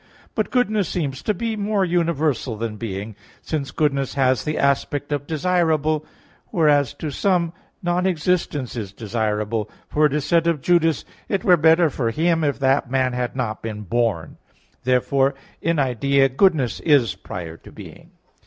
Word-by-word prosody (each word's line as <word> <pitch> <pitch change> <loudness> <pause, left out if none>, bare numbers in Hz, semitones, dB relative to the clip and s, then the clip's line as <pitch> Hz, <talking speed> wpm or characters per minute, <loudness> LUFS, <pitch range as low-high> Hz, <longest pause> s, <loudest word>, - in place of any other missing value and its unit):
But - - -1
goodness 215 -7 +1
seems 140 -6 -3
to - - 0
be 225 +3 -2
more 205 -1 0
universal 160 -9 0
than 115 -1 -3
being, 105 0 -5 0.3
since 145 -4 -3
goodness 140 -4 0
has 130 -4 +2
the 155 - -1
aspect 140 +1 0
of 145 -1 -2
desirable; 155 -2 +1 0.4
whereas 150 - +2
to 155 - -5
some 170 0 +1 0.3
non 175 +1 +1
existence 160 -7 -1
is 105 -5 -5
desirable; 105 0 -2 0.2
for 150 0 +3
it 145 - -5
is 150 -1 -1
said 170 0 +2
of 165 -3 +1
Judas: 165 +1 +2 0.2
"It 195 - 0
were 185 -5 +6
better 160 0 +4
for 120 -4 -1
him, 165 +6 +1
if 145 -2 0
that 135 -1 +1
man 130 -1 +1
had 125 0 -2
not 120 -5 -3
been 110 -2 -5
born" 105 -6 -1
(Matt. - - -37
26:24). - - -44
Therefore 135 +2 +2 0.3
in 165 0 +1
idea 135 +1 +2
goodness 135 - +2
is 140 - +3
prior 90 -3 -7
to - - -15
being. - - -12
145 Hz, 165 wpm, -22 LUFS, 120-165 Hz, 0.4 s, were